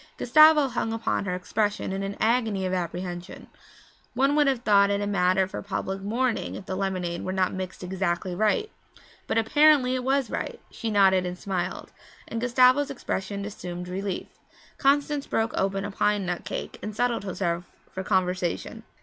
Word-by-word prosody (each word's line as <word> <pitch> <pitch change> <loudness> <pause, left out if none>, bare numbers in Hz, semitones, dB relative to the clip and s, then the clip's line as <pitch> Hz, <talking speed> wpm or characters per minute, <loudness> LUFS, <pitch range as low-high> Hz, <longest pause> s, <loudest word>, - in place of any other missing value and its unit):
Gustavo 305 +2 +6
hung 235 -2 -2
upon 225 -2 -1
her 180 -2 -1
expression 205 +2 -1
in 195 - -3
an 195 0 -4
agony 220 -4 +1
of 185 - -1
apprehension; 175 0 -4 0.7
one 275 +3 +3
would 295 -1 +4
have 260 -3 0
thought 200 -2 +5
it 200 0 +1
a 205 - -1
matter 190 -1 +2
for - - -6
public 195 -1 -4
mourning 235 +4 -1
if 190 - -8
the 190 - -4
lemonade 185 -3 -2
were 185 - -3
not 185 -1 0
mixed 185 0 -6
exactly 180 -1 -2
right. 215 - +1 0.6
But - - 0
apparently 270 +3 +4
it 255 -1 -1
was 270 0 +1
right - - -4
she 230 - -4
nodded 195 -3 +4
and 180 0 -5
smiled 185 -2 -4 0.4
and 230 - -4
Gustavo's 255 +3 +4
expression 200 -6 -4
assumed 180 -3 -6
relief. 190 +1 -3 0.5
Constance 285 +1 +2
broke 225 +1 0
open 195 0 0
a 205 - -4
pine 205 0 +1
nut 175 -1 -3
cake - - -5
and 210 -1 -6
settled 240 -1 0
herself 175 -3 -2 0.3
for 190 - -5
conversation. 185 -2 -1
200 Hz, 170 wpm, -26 LUFS, 185-240 Hz, 0.7 s, Gustavo